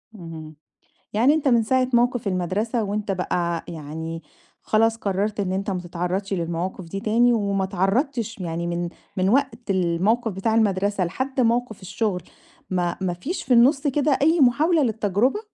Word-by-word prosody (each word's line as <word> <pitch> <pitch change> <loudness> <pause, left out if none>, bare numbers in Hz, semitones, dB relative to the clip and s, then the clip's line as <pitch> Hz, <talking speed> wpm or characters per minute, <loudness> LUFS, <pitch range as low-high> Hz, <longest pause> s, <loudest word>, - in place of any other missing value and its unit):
اهم، 160 -4 -9 0.6
يعني 245 +8 +4
أنت 295 -3 +1
من 235 -2 +4
ساعة 255 +3 +1
موقف 240 -2 +2
المدرسة 195 +6 -1
وأنت 205 0 -2
بقى 170 -2 -1
يعني 160 +1 -6 0.4
خلاص 225 +1 +2
قرّرت 205 0 -1
إن 185 -2 -1
أنت 195 +1 -2
ما 180 -2 -2
تتعرّضش 180 +3 -3
للمواقف 175 +1 -3
دي 195 +4 -5
تاني، 235 +3 +3
وما 200 -4 0
اتعرّضتش 225 - -1
يعني 170 -2 -3
من 175 0 -2 0.3
من 185 0 +1
وقت 240 -3 0
الموقف 190 +6 +1
بتاع 195 +4 -1
المدرسة 200 -3 +1
لحد 260 +9 -2
موقف 235 -2 +1
الشغل، 185 -1 -2 0.5
ما 175 -2 0
ما 185 -2 -1
فيش 290 - -4
في 255 - +2
النُصّ 270 +5 +4
كده 285 0 +2
أي 320 +2 +4
محاولة 300 +6 +4
للتجربة؟ 225 - +1
205 Hz, 155 wpm, -23 LUFS, 180-240 Hz, 0.6 s, يعني